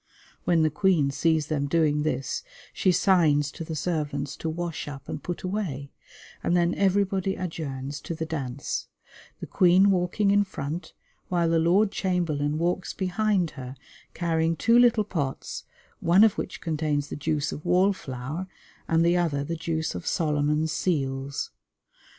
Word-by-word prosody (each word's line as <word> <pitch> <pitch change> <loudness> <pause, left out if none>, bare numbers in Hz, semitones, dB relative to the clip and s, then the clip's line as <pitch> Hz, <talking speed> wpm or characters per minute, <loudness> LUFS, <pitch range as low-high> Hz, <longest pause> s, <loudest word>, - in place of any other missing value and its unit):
When 165 -2 +3
the 155 - +2
Queen 160 -4 +2
sees 155 +2 +1
them 145 -2 -1
doing 150 -1 +2
this 135 -3 -2 0.3
she 185 - +2
signs 155 -6 +3
to - - -7
the 160 0 -5
servants 150 -3 -2
to 165 - -3
wash 170 -1 -4
up 140 -2 -8
and - - -5
put 175 - -5
away, 180 -8 -3 0.5
and 175 - +2
then 175 0 +2
everybody 195 -1 +1
adjourns 145 -5 -5
to 170 - -5
the 160 0 -3
dance, 140 -4 -4 0.5
the - - -3
Queen 185 +2 +5
walking 190 +3 +1
in 205 0 +4
front 165 -3 -5 0.3
while 175 -2 +1
the 165 0 +3
Lord 190 +6 +3
Chamberlain 155 -7 0
walks 175 +3 -1
behind 190 -2 +1
her, 130 0 -8 0.4
carrying 165 -1 +1
two 230 +7 +4
little 240 -3 +5
pots, 155 -10 -4 0.3
one 180 +5 +5
of 220 -3 +5
which 185 - -5
contains 150 -3 -1
the - - -4
juice 150 0 -1
of 150 - -7
wall 180 +3 +3
flower 145 +3 -6 0.4
and 165 0 +3
the 170 +1 +4
other 155 -5 0
the 165 +4 -3
juice 160 -1 -2
of 90 - -6
Solomon's 150 0 +1
Seals. 140 -4 -2
165 Hz, 155 wpm, -26 LUFS, 145-180 Hz, 0.5 s, Queen